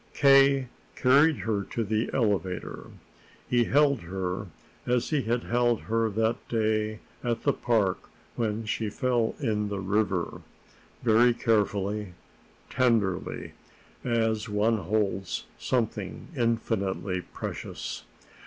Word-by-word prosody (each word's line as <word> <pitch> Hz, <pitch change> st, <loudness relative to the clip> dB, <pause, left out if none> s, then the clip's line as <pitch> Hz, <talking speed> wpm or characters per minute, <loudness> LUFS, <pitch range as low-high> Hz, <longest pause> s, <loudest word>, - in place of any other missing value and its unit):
K. 135 Hz, -1 st, +5 dB, 0.3 s
carried 145 Hz, +5 st, +5 dB
her 105 Hz, -3 st, 0 dB
to 115 Hz, -, -2 dB
the 110 Hz, +2 st, 0 dB
elevator. 100 Hz, -7 st, -1 dB, 0.6 s
He 120 Hz, -1 st, +3 dB
held 140 Hz, -1 st, +3 dB
her 95 Hz, +2 st, -4 dB, 0.4 s
as 125 Hz, +3 st, +1 dB
he 150 Hz, -3 st, +2 dB
had 120 Hz, +1 st, -1 dB
held 120 Hz, -1 st, +1 dB
her 115 Hz, 0 st, 0 dB
that 110 Hz, +2 st, +1 dB
day 110 Hz, -1 st, 0 dB, 0.2 s
at 120 Hz, -2 st, -1 dB
the -, -, +3 dB
park 110 Hz, -6 st, 0 dB, 0.3 s
when 110 Hz, -1 st, -1 dB
she 110 Hz, 0 st, -1 dB
fell 120 Hz, 0 st, 0 dB
in 105 Hz, -6 st, 0 dB
the 100 Hz, -, -3 dB
river, 95 Hz, -2 st, -1 dB, 0.6 s
very 120 Hz, +1 st, +5 dB
carefully, 105 Hz, -4 st, 0 dB, 0.5 s
tenderly, 115 Hz, -8 st, 0 dB, 0.5 s
as 110 Hz, -3 st, 0 dB
one 105 Hz, +2 st, +2 dB
holds 100 Hz, -1 st, -1 dB
something 110 Hz, -6 st, -2 dB
infinitely 100 Hz, -6 st, -1 dB
precious. -, -, -6 dB
110 Hz, 110 wpm, -27 LUFS, 105-120 Hz, 0.6 s, K